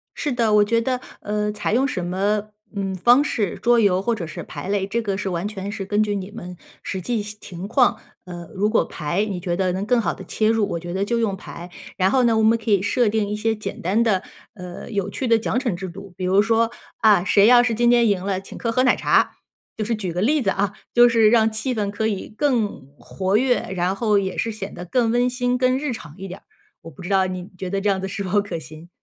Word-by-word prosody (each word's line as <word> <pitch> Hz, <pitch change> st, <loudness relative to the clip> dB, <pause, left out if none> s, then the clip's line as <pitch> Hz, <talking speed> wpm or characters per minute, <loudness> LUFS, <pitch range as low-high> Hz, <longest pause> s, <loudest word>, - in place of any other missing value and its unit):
是 295 Hz, -, -2 dB
的， 230 Hz, -3 st, +1 dB
我 210 Hz, 0 st, +6 dB
觉 230 Hz, +2 st, +1 dB
得 255 Hz, +1 st, -1 dB, 0.2 s
呃， 210 Hz, 0 st, -1 dB
采 210 Hz, 0 st, -2 dB
用 260 Hz, +4 st, +3 dB
什 185 Hz, -9 st, -3 dB
么， 205 Hz, +4 st, -1 dB, 0.3 s
嗯， 195 Hz, -1 st, -2 dB
方 240 Hz, +9 st, +5 dB
式， 215 Hz, -9 st, -2 dB
桌 240 Hz, 0 st, +4 dB
游 190 Hz, -4 st, +3 dB
或 235 Hz, +4 st, 0 dB
者 175 Hz, -6 st, -5 dB
是 -, -, -7 dB
牌 -, -, -8 dB
类， 200 Hz, -1 st, 0 dB
这 235 Hz, +4 st, -1 dB
个 200 Hz, -3 st, -2 dB
是 195 Hz, -1 st, -3 dB
完 175 Hz, +2 st, -2 dB
全 200 Hz, -1 st, -5 dB
是 200 Hz, -2 st, -5 dB
根 205 Hz, +2 st, +1 dB
据 205 Hz, -1 st, -1 dB
你 195 Hz, 0 st, -5 dB
们 180 Hz, -5 st, -9 dB, 0.3 s
实 190 Hz, -, -4 dB
际 225 Hz, +4 st, -1 dB
情 200 Hz, -3 st, -8 dB
况， 245 Hz, +3 st, +3 dB, 0.3 s
呃， 175 Hz, -2 st, -8 dB
如 205 Hz, +2 st, +1 dB
果 220 Hz, -, +3 dB
牌 170 Hz, +9 st, -2 dB
你 195 Hz, -4 st, -4 dB
觉 175 Hz, -1 st, -2 dB
得 185 Hz, 0 st, 0 dB
能 190 Hz, +2 st, -3 dB
更 240 Hz, +2 st, +2 dB
好 -, -, -1 dB
地 -, -, -10 dB
切 215 Hz, 0 st, 0 dB
入， 225 Hz, -2 st, +2 dB
我 170 Hz, -, -2 dB
觉 175 Hz, +1 st, -7 dB
得 195 Hz, +2 st, -1 dB
就 235 Hz, +2 st, 0 dB
用 215 Hz, -4 st, 0 dB
牌。 175 Hz, -1 st, -9 dB, 0.3 s
然 190 Hz, 0 st, +2 dB
后 255 Hz, +1 st, +3 dB
呢， 230 Hz, -2 st, +3 dB
我 220 Hz, -, +2 dB
们 225 Hz, +1 st, +4 dB
可 225 Hz, 0 st, -6 dB
以 200 Hz, -2 st, +4 dB
设 225 Hz, +4 st, +1 dB
定 210 Hz, -1 st, 0 dB
一 210 Hz, -, -2 dB
些 220 Hz, +1 st, 0 dB
简 215 Hz, -, -6 dB
单 200 Hz, +7 st, +2 dB
的， 200 Hz, -5 st, +1 dB, 0.3 s
呃， 180 Hz, -3 st, -9 dB
有 200 Hz, -2 st, -1 dB
趣 255 Hz, +5 st, -3 dB
的 230 Hz, -1 st, +5 dB
奖 225 Hz, -, -1 dB
惩 245 Hz, -7 st, -1 dB
制 190 Hz, +2 st, -6 dB
度， 195 Hz, +1 st, -10 dB
比 185 Hz, -, -3 dB
如 190 Hz, +2 st, +4 dB
说， 225 Hz, +1 st, +2 dB, 0.3 s
啊， 210 Hz, -5 st, +4 dB
谁 200 Hz, +1 st, +4 dB
要 240 Hz, +1 st, +7 dB
是 245 Hz, -1 st, 0 dB
今 240 Hz, +2 st, +2 dB
天 240 Hz, -1 st, +5 dB
赢 190 Hz, -3 st, 0 dB
了， 190 Hz, -1 st, -1 dB
请 195 Hz, -, -11 dB
客 230 Hz, -, -2 dB
喝 255 Hz, +3 st, +2 dB
奶 255 Hz, -, +4 dB
茶。 -, -, +2 dB, 0.4 s
就 215 Hz, -, -1 dB
是 230 Hz, +1 st, 0 dB
举 195 Hz, -5 st, -4 dB
个 175 Hz, +2 st, -2 dB
例 290 Hz, +8 st, +2 dB
子 205 Hz, -, +1 dB
啊， 200 Hz, +1 st, 0 dB, 0.2 s
就 240 Hz, 0 st, +7 dB
是 225 Hz, -2 st, +4 dB
让 225 Hz, -1 st, +4 dB
气 220 Hz, +4 st, -2 dB
氛 210 Hz, -3 st, -1 dB
可 205 Hz, +2 st, -2 dB
以 205 Hz, -3 st, -2 dB
更 230 Hz, -, -1 dB, 0.2 s
活 190 Hz, +1 st, -1 dB
跃， 250 Hz, +1 st, +2 dB, 0.2 s
然 180 Hz, +2 st, 0 dB
后 210 Hz, -1 st, +2 dB
也 190 Hz, -1 st, -3 dB
是 225 Hz, -, -1 dB
显 205 Hz, -2 st, -7 dB
得 175 Hz, -, -7 dB
更 230 Hz, +6 st, +1 dB
温 245 Hz, +2 st, +2 dB
馨 250 Hz, 0 st, 0 dB
更 255 Hz, 0 st, +2 dB
日 290 Hz, -3 st, -2 dB
常 150 Hz, -9 st, -10 dB
一 195 Hz, 0 st, -7 dB
点 185 Hz, +1 st, -9 dB
儿。 -, -, -42 dB, 0.4 s
我 165 Hz, -2 st, -11 dB
不 145 Hz, -, -13 dB
知 175 Hz, -, -7 dB
道 190 Hz, -1 st, +2 dB
你 185 Hz, 0 st, -6 dB
觉 185 Hz, 0 st, -5 dB
得 195 Hz, +1 st, -1 dB
这 205 Hz, +1 st, 0 dB
样 190 Hz, -1 st, 0 dB
子 -, -, -3 dB
是 195 Hz, +1 st, -5 dB
否 200 Hz, +2 st, +1 dB
可 190 Hz, -5 st, -5 dB
行？ 155 Hz, +2 st, -12 dB
205 Hz, 285 characters per minute, -22 LUFS, 190-230 Hz, 0.4 s, 要